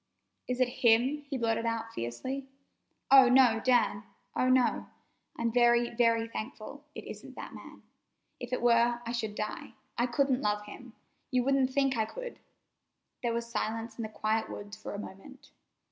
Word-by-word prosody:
"Is 250 Hz, 0 st, -2 dB
it 255 Hz, -, +4 dB
him?" 255 Hz, +6 st, +3 dB
he 275 Hz, -, -2 dB
blurted 230 Hz, -1 st, 0 dB
out 230 Hz, 0 st, -3 dB
fiercely. 260 Hz, -, -4 dB, 0.6 s
"Oh, 265 Hz, -2 st, +9 dB
no, 250 Hz, -3 st, +5 dB
Dan! 240 Hz, -5 st, +3 dB, 0.3 s
Oh, 255 Hz, -, +2 dB
no! 255 Hz, -1 st, +2 dB, 0.5 s
I'm 230 Hz, 0 st, 0 dB
very, 240 Hz, 0 st, +4 dB
very 230 Hz, -1 st, +2 dB
thankful 230 Hz, +5 st, -7 dB
it -, -, -7 dB
isn't -, -, -10 dB
that -, -, -8 dB
man. -, -, -12 dB, 0.6 s
If 245 Hz, -1 st, -7 dB
it 250 Hz, -, -1 dB
were, 235 Hz, 0 st, +4 dB
I 230 Hz, -, -3 dB
should 220 Hz, -3 st, -3 dB
die. 215 Hz, 0 st, -5 dB, 0.3 s
I 240 Hz, -, +3 dB
couldn't 265 Hz, +1 st, +1 dB
love 210 Hz, 0 st, 0 dB
him. 225 Hz, +3 st, -11 dB, 0.4 s
You 250 Hz, -1 st, +2 dB
wouldn't 270 Hz, 0 st, +2 dB
think 270 Hz, 0 st, +1 dB
I 220 Hz, -, +2 dB
could!" -, -, -8 dB, 0.8 s
There 240 Hz, -2 st, 0 dB
was 235 Hz, 0 st, -2 dB
silence 225 Hz, 0 st, -3 dB
in -, -, -1 dB
the 220 Hz, -, -4 dB
quiet 215 Hz, +1 st, -1 dB
woods 205 Hz, +1 st, -7 dB
for 215 Hz, -, -7 dB
a -, -, -4 dB
moment. 205 Hz, +7 st, -11 dB
235 Hz, 170 wpm, -30 LUFS, 225-255 Hz, 0.8 s, Oh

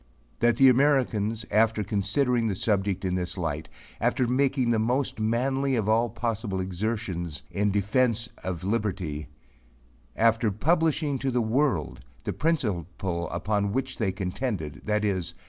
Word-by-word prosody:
That 120 Hz, -1 st, +3 dB
the 135 Hz, -, +7 dB
Americans 125 Hz, -5 st, +2 dB
after 110 Hz, 0 st, +3 dB
considering 115 Hz, +5 st, +1 dB
the 100 Hz, -, -1 dB
subject 100 Hz, -1 st, 0 dB
in 90 Hz, -, 0 dB
this 90 Hz, +1 st, -3 dB
light 80 Hz, -3 st, -3 dB, 0.3 s
after 125 Hz, -, +1 dB
making 130 Hz, -1 st, +2 dB
the 115 Hz, -, +2 dB
most 125 Hz, +2 st, 0 dB
manly 130 Hz, +5 st, +1 dB
of 110 Hz, -4 st, 0 dB
all 115 Hz, +2 st, +3 dB
possible 110 Hz, -3 st, -2 dB
exertions 95 Hz, -3 st, -3 dB
in 105 Hz, +1 st, +1 dB
defence 110 Hz, +3 st, +1 dB, 0.2 s
of 90 Hz, -2 st, -4 dB
liberty 95 Hz, -8 st, -2 dB, 0.9 s
after 115 Hz, 0 st, +3 dB
publishing 155 Hz, -, +1 dB
to 135 Hz, -, -1 dB
the 125 Hz, -1 st, +1 dB
world 115 Hz, -, 0 dB, 0.2 s
the 105 Hz, -, -2 dB
principle 95 Hz, -, -1 dB
upon 100 Hz, +3 st, -1 dB
which 130 Hz, +1 st, -2 dB
they 105 Hz, -4 st, +1 dB
contended, 95 Hz, -, -3 dB
viz. 105 Hz, -4 st, -1 dB
110 Hz, 135 wpm, -27 LUFS, 95-125 Hz, 0.9 s, the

